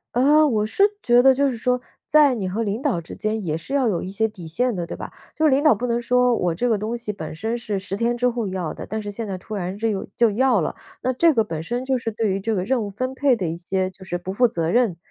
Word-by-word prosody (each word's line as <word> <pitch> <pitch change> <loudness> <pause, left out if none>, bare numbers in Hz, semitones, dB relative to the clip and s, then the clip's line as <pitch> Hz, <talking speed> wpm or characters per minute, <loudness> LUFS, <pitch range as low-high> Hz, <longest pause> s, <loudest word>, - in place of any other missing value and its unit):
呃， 295 +5 +5
我 220 -7 +1
是 220 - +1 0.2
觉 240 0 +5
得 270 - +7
就 275 +1 +2
是 245 - -3
说 250 +2 0 0.3
在 290 -3 +5
你 190 -4 -3
和 215 +5 -2
领 215 +3 -2
导 175 - 0
之 165 - -9
间 215 -1 -2
也 155 -1 -1
是 270 +12 -8
要 265 -4 +2
有 180 -6 0
一 185 - -5
些 215 +3 0
底 190 -6 -11
线 240 +9 0
的， 175 -2 -3
对 - - -7
吧？ - - -6 0.3
就 315 - +2
是 305 - +6
领 275 +2 +3
导 305 - +6
不 245 +4 -3
能 235 0 0
说 250 0 +3
我 175 -5 0
这 245 +9 -1
个 225 - +2
东 220 +4 -3
西 215 -3 -3
本 160 -7 -7
身 220 +8 -3
是 210 -4 -3
10 195 0 -5
天 235 +3 0
之 250 +1 +2
后 235 -2 -2
要 180 -4 -3
的， - - -8
但 220 0 -4
是 205 - -6
现 220 +3 -4
在 195 -3 -4
突 210 +4 -8
然 185 0 -4
这 225 +2 -1
又 200 -3 -2
就 235 -2 +5
要 245 +1 +3
了。 160 - -2 0.3
那 255 - 0
这 330 +5 +4
个 225 -4 +2
本 160 -5 -5
身 245 +8 -3
就 260 -1 +1
是 230 -1 -3
对 215 -2 -1
于 195 0 -2
这 225 +2 -1
个 185 -3 -1
任 245 0 +1
务 205 - -4
分 255 +6 -3
配 265 -3 +3
的 180 -5 -2
一 165 - -3
些 185 +2 -1
就 190 0 -15
是 175 -1 -3
不 180 +2 -6
负 245 +5 +3
责 165 -4 -1
任， 215 -4 +2
220 Hz, 320 characters per minute, -22 LUFS, 190-250 Hz, 0.3 s, 得